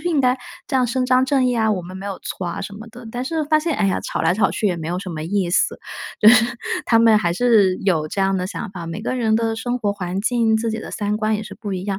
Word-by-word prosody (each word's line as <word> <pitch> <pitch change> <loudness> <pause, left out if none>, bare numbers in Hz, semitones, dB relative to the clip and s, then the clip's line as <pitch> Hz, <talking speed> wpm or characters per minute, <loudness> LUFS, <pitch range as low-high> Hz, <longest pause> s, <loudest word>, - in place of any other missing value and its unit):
是 350 - -2
应 315 -5 +2
该 255 0 +3 0.3
这 270 - +1
样 255 - +3
伸 255 +2 0
张 255 0 +4
正 265 -1 +2
义 250 -1 +1
啊， 220 -1 +2
我 195 -4 0
们 185 +2 -9
没 195 +1 -7
有 195 -2 -5
错 185 - -5
啊 170 - -4
什 200 +1 -6
么 220 +3 -10
的， 235 +1 -12
但 245 +2 -4
是 315 +2 -1
发 310 +1 +3
现， 315 -1 -1
哎 210 -2 +2
呀， 190 - 0
吵 - - -3
来 165 +2 +3
吵 205 - +2
去 215 - -1
也 180 -3 0
没 160 -1 -6
有 175 +1 -2
什 185 -1 -6
么 155 -2 -5
意 190 0 0
思。 180 - +1 0.4
就 210 - +8
是 235 0 +7 0.4
他 230 - +4
们 225 -2 +6
还 175 -5 0
是 205 -3 +3
有 160 -6 +2
这 195 - -3
样 195 0 +2
的 180 - -2
想 215 +2 -6
法， 175 -4 -7
每 165 +5 -5
个 255 - -2
人 225 -3 +1
的 225 -1 -1
生 245 +2 -2
活 205 -4 0
环 190 -1 -4
境， 225 0 +2
自 230 +1 -1
己 220 - -3
的 - - -7
三 210 -1 -1
观 215 0 0
也 215 - -5
是 - - -10
不 205 -3 -5
一 185 -1 -3
样， 195 -1 -2
215 Hz, 330 characters per minute, -21 LUFS, 190-245 Hz, 0.4 s, 就